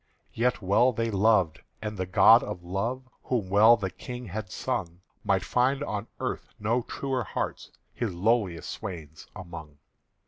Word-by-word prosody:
Yet 120 -2 0
well 110 +7 +4
they 115 0 -1
loved; 100 -5 +3 0.2
and 105 0 -5
the 95 -2 -3
god 90 - +7
of 85 - -6
Love, 115 +9 -3 0.2
Whom 115 -7 -1
well 110 +4 +7
the 95 -2 -3
King 125 -1 -8
had 105 0 -5
sung, 85 +1 -3 0.2
Might 95 -3 +1
find 130 +5 +1
on 105 -5 -4
the - - -4
earth - - -3
no 115 +4 0
truer 130 +1 -3
hearts - - -4 0.2
His 120 -4 -2
lowliest 95 -1 0
swains 80 -8 -8
among. 80 -5 -9
105 Hz, 160 wpm, -27 LUFS, 90-120 Hz, 0.2 s, god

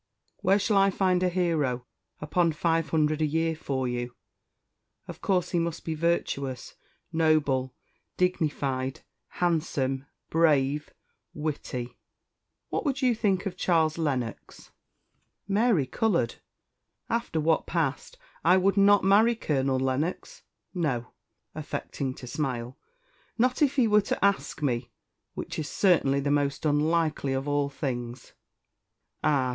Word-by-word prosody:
Where 195 +2 +3
shall 205 0 +1
I 195 0 +5
find 185 -2 +1
a 185 - +2
hero 155 -9 0 0.4
upon 165 +2 +1
five 165 +1 0
hundred 155 -1 +1
a - - +4
year 160 +2 0
for 135 -4 -2
you? 120 0 -4 0.9
Of - - -9
course 180 -2 0
he 175 - +1
must 165 -1 -3
be 160 - -1
virtuous, 145 -5 -1 0.4
noble, 150 -5 +2 0.4
dignified, 140 -7 -1 0.3
handsome, 145 -6 -1 0.2
brave, 150 -3 +2 0.5
witty. 140 -5 -4 0.7
What - - -2
would 275 -3 -1
you 250 -2 +4
think 200 -4 0
of 190 -2 -3
Charles 165 -3 +1
Lennox?" 130 -7 -3 0.8
Mary 200 - +2
coloured. 170 - 0 0.7
"After 230 -8 -1
what 160 +1 +1
passed, 165 - -2 0.3
I 180 +3 +5
would 195 +2 +2
not 200 0 +6
marry 215 +5 +5
Colonel 135 -9 0
Lennox; 145 - -2 0.3
no" 135 -9 -2 0.4
affecting 140 -3 -4
to - - -10
smile 125 -2 -3 0.6
"not 250 +3 +1
if 285 -2 +3
he 255 -5 +4
were 210 0 +5
to 200 - -1
ask 200 -5 0
me, 120 -3 -1 0.5
which - - -5
is 150 - -3
certainly 155 -8 +3
the 140 +1 0
most 145 0 0
unlikely 155 -1 +1
of 135 +2 -2
all 145 -1 +1
things." 125 -3 -5 0.9
"Ah! 135 -4 +2
155 Hz, 130 wpm, -27 LUFS, 135-180 Hz, 0.9 s, not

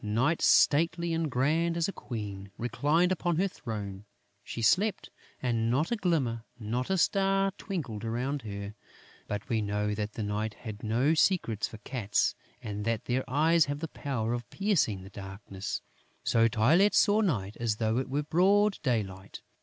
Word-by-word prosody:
Night, 120 +10 +1
stately 165 +3 +4
and 165 -1 0
grand 160 +7 +1
as 170 - +1
a - - -2
Queen, 100 -5 -6
reclined 145 +9 +1
upon 175 -1 0
her 190 +5 +2
throne; 105 - -6 0.4
she - - -6
slept; 195 - +2 0.3
and 115 -2 +1
not 140 - +1
a - - +3
glimmer, 145 - 0
not 120 +3 -3
a 190 - +2
star 195 +2 +2
twinkled 125 - -5
around 125 +5 -2
her. 100 -2 -6 0.5
But 105 0 -4
we 115 -4 0
know 105 0 -1
that 105 0 -3
the 110 - -4
night 105 +1 -2
has 110 -3 -7
no 120 +8 +2
secrets 155 - +2
for 110 - -10
cats 110 -2 0 0.3
and 105 -1 -4
that 115 0 -1
their 130 +1 0
eyes 160 +3 +4
have 145 0 -3
the 165 - -3
power 120 -6 -2
of 120 -3 -4
piercing 165 - +1
the 95 - -12
darkness. 95 0 -6 0.4
So 115 0 +4
Tylette 145 - +4
saw 210 +1 +5
Night 105 - -1
as 115 -2 0
though 110 +2 0
it 130 - -3
were 145 +3 0
broad 195 +6 +3
daylight. 100 -7 -3
120 Hz, 170 wpm, -29 LUFS, 105-165 Hz, 0.5 s, saw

